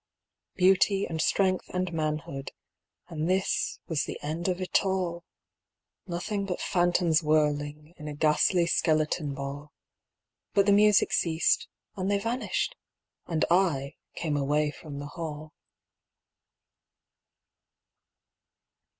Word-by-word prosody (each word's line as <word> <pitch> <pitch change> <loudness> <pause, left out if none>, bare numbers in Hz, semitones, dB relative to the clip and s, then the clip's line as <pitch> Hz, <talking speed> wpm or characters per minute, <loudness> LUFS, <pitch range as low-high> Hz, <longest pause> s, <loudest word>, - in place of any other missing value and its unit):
Beauty 195 +1 +4
and 160 -1 -3
strength 185 +2 +1
and 180 -1 -2
manhood 155 -3 -3 0.5
And 165 -1 -3
this 190 +1 0
was 155 -4 -1
the - - -5
end 160 +4 -3
of 180 -1 0
it 185 - +1
all: 180 -3 -1 0.8
Nothing 195 +3 -2
but 180 - -3
phantoms 175 -3 +2
whirling 150 0 0
In 150 - -8
a 150 - -5
ghastly 155 +4 +3
skeleton 155 -3 +1
ball. 140 +2 -6 0.8
But 200 - +5
the 200 - +4
music 210 0 +5
ceased 160 -1 +2 0.3
and 190 -1 -2
they 205 - +3
vanished, 240 - -2 0.5
And 160 -2 +1
I 160 -7 +2 0.2
came 155 -3 -2
away 145 +1 +1
from 150 -2 -9
the 145 - -5
hall. 155 0 -7
165 Hz, 115 wpm, -28 LUFS, 150-185 Hz, 0.8 s, But